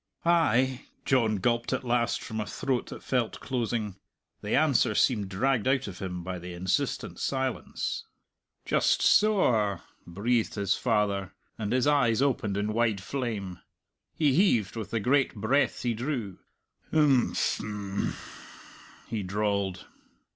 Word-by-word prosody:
"Ay," 130 -7 +2 0.2
John 115 -5 +2
gulped 120 +4 0
at 130 - -1
last 120 -1 0
from 110 -1 -5
a - - -3
throat 130 -3 -2
that - - -9
felt 125 -4 -1
closing. 115 -5 -2 0.4
The - - -1
answer - - +3
seemed 105 -6 +2
dragged 125 +4 +1
out 135 -2 +1
of 95 -3 -8
him 90 -2 -5
by 90 0 -4
the 90 +1 -8
insistent 90 +1 -1
silence. 130 -2 -2 0.6
"Just - - +2
so 210 -2 +5
a!" 105 -6 +1 0.2
breathed 110 +6 0
his 100 -3 +1
father, 100 -5 0 0.2
and 105 -2 -4
his 130 +1 +2
eyes 140 -6 +3
opened 120 -7 0
in 105 +1 -1
wide 110 -3 +1
flame. 100 -6 -4 0.6
He 150 -4 +3
heaved 120 - +2
with 110 -3 -5
the 115 - -1
great 130 +5 +2
breath 130 +2 +1
he 120 -1 +1
drew.... 115 - -4 0.5
"Im 145 -6 +3
phm!" 100 -2 -2 0.9
he 110 -2 -3
drawled. 100 -1 -1
115 Hz, 140 wpm, -28 LUFS, 100-130 Hz, 0.9 s, so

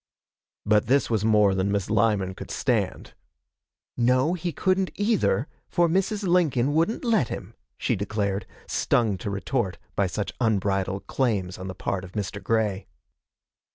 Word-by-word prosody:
But 105 +1 +3
this 135 0 +2
was 110 -3 +1
more 105 -3 +4
than 95 +1 0
Miss 100 -2 0
Lyman 105 -3 +2
could - - -9
stand. 115 -8 -1 0.8
'No, 130 +6 +3
he 175 -1 -2
couldn't 185 +3 +1
either, 205 - +1 0.2
for 175 0 +3
Mrs. 195 +4 0
Lincoln 155 -8 +2
wouldn't 165 +11 +1
let 220 - +3
him,' - - -7 0.2
she - - 0
declared, 100 -1 -2 0.2
stung 110 -5 +1
to 100 - -4
retort 100 0 -2 0.2
by 100 - +2
such 100 +2 -3
unbridled 100 -3 0
claims 100 -9 -1
on 95 - -6
the 95 - -6
part 95 -1 -2
of 95 - -10
Mr. 100 -1 -4
Grey. 105 -4 0
110 Hz, 150 wpm, -25 LUFS, 100-145 Hz, 0.8 s, more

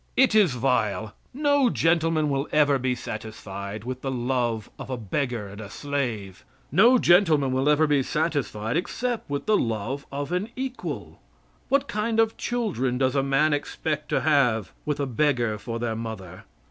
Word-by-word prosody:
It 265 -3 +5
is 205 -10 +5
vile. 110 -5 0 0.2
No 285 -1 +3
gentleman 165 -4 +2
will 140 +1 -1
ever 145 -2 +4
be 130 0 0
satisfied 105 -3 -6
with 130 +1 -5
the 135 - -3
love 120 -3 -1
of - - -7
a 130 - -2
beggar 120 0 -2
and 100 +2 -9
a 100 - -8
slave 115 -6 -3 0.3
no 230 - +6
gentleman 165 - +4
will 130 +3 +1
ever 150 +1 +4
be 145 -2 +3
satisfied 140 -6 -1
except 240 +5 -3
with 140 0 -3
the 215 - +3
love 115 +5 -2
of 140 +2 -4
an 180 +5 -1
equal. 260 0 -5 0.5
What 275 +1 +2
kind 220 +2 -1
of 225 0 +3
children 190 - -1
does 130 +1 +1
a 135 - +3
man 140 +3 +2
expect 150 +1 -3
to - - +1
have 125 - +2 0.2
with 150 -1 -1
a 140 - +1
beggar 120 -4 +1
for 115 +2 -5
their 115 -1 -2
mother? 110 -6 -7
135 Hz, 170 wpm, -25 LUFS, 115-165 Hz, 0.5 s, no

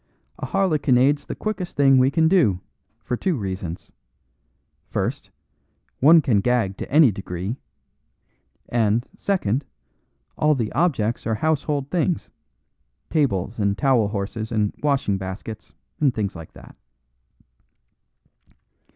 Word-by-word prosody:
"A - - -4
harlequinade's 145 -7 +2
the - - -4
quickest 195 -5 -4
thing 135 -2 +5
we 130 +1 +4
can 160 +2 +3
do, 160 - +3 0.4
for 125 - -2
two 180 +7 -1
reasons. 95 - -5 1.0
First, - - -3 0.7
one 160 +4 +7
can 105 -6 +2
gag 115 -5 +1
to - - -7
any 145 -4 +6
degree; 95 +2 -5 1.1
and, 115 0 +1
second, 150 - 0 0.8
all 150 0 +4
the 115 -5 -2
objects 130 -11 0
are 110 - +1
household 145 +1 -1
things 175 -1 -1 0.8
tables 115 - 0
and 100 -1 +1
towel 130 -6 +3
horses 105 +2 -4
and 105 -3 0
washing 140 -9 +1
baskets, 95 +3 -7 0.3
and 145 -3 +3
things 105 -5 -3
like 80 -2 -10
that." - - -14
125 Hz, 115 wpm, -23 LUFS, 105-150 Hz, 1.1 s, one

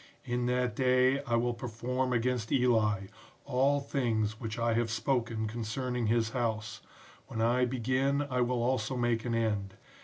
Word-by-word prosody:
In 120 -1 -1
that 125 -2 0
day 130 +1 +3
I 120 -3 +1
will 120 +1 +1
perform 125 +2 -2
against 120 -1 0
Eli, 110 -6 +3 0.4
all 140 +3 +2
things 110 -6 -1
which 110 -1 -5
I 115 0 +1
have 115 0 +1
spoken 115 -2 -1
concerning 120 +2 -2
his 115 0 +1
house; 110 -3 -2 0.5
when 110 - -6
I 120 +3 +3
begin 130 +3 0
I 125 -3 -1
will 120 -1 +1
also 125 0 0
make 120 -2 0
an 120 -1 0
end. 105 -4 -1
120 Hz, 155 wpm, -31 LUFS, 115-125 Hz, 0.5 s, day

